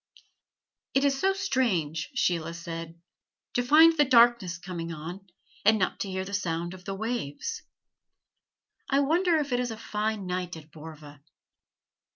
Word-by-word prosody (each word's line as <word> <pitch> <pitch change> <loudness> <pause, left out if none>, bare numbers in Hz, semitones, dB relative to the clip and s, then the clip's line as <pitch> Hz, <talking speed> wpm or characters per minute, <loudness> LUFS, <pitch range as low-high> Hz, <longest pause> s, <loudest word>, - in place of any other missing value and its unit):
"It 270 +1 +4
is 275 -1 +2
so 385 - +4
strange," 230 - 0
Sheila 170 -8 0
said, 165 0 -7 0.5
"to 245 - +2
find 315 +6 +6
the 295 - +5
darkness 235 -9 +4
coming 170 -1 -6
on, 170 +5 -8 0.4
and 220 +1 +5
not 185 -3 -1
to 200 - -3
hear 190 0 -3
the 200 - -8
sound 175 -3 -2
of 185 -1 -13
the 195 - -4
waves. 235 - -4 1.3
I 275 +1 +3
wonder 335 +4 +3
if 290 -3 -2
it 245 - +2
is 250 -1 -1
a 225 - -6
fine 215 -2 -3
night 180 -1 -3
at 155 -1 -14
Borva." 150 -2 -11
195 Hz, 155 wpm, -27 LUFS, 170-255 Hz, 1.3 s, find